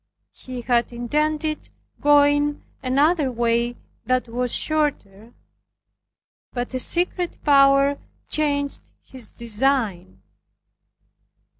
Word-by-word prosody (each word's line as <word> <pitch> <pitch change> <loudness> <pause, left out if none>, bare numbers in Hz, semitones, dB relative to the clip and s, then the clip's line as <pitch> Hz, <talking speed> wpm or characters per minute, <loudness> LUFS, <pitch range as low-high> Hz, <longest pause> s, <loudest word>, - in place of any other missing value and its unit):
He 255 -1 -8
had 240 0 +1
intended 300 +6 -2 0.3
going 290 0 +3 0.2
another 280 +2 +2
way 235 0 0 0.3
that 255 -1 +1
was 245 +1 -2
shorter, 240 -8 -2 1.2
but 245 0 -4
a 255 - -1
secret 350 +4 0
power 275 0 +4 0.3
changed 285 -2 -1
his 255 -5 -10
design. 225 -6 -1
270 Hz, 85 wpm, -22 LUFS, 240-290 Hz, 1.2 s, power